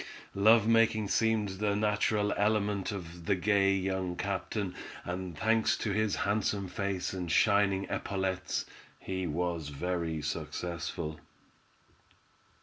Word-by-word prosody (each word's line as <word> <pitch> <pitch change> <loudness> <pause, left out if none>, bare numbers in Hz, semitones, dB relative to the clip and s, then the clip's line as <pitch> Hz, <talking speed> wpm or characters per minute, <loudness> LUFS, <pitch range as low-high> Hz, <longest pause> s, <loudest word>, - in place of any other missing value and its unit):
Love 110 +2 +5
making 115 -2 +4
seemed 110 0 +2
the 105 -1 +1
natural 105 0 +1
element 105 -1 +1
of 85 -4 -7
the 100 - +3
gay 100 +1 +3
young 95 -1 -1
captain, 100 0 -2 0.3
and 90 -2 -4
thanks 110 +3 +2
to 105 - -2
his 110 0 +1
handsome 100 -1 0
face 95 -1 -2
and 90 -3 -3
shining 100 0 +3
epaulettes, 95 -1 -2 0.3
he 95 -1 -3
was 85 -1 -2
very 85 +1 -2
successful. 80 0 -4
95 Hz, 115 wpm, -31 LUFS, 90-105 Hz, 0.3 s, Love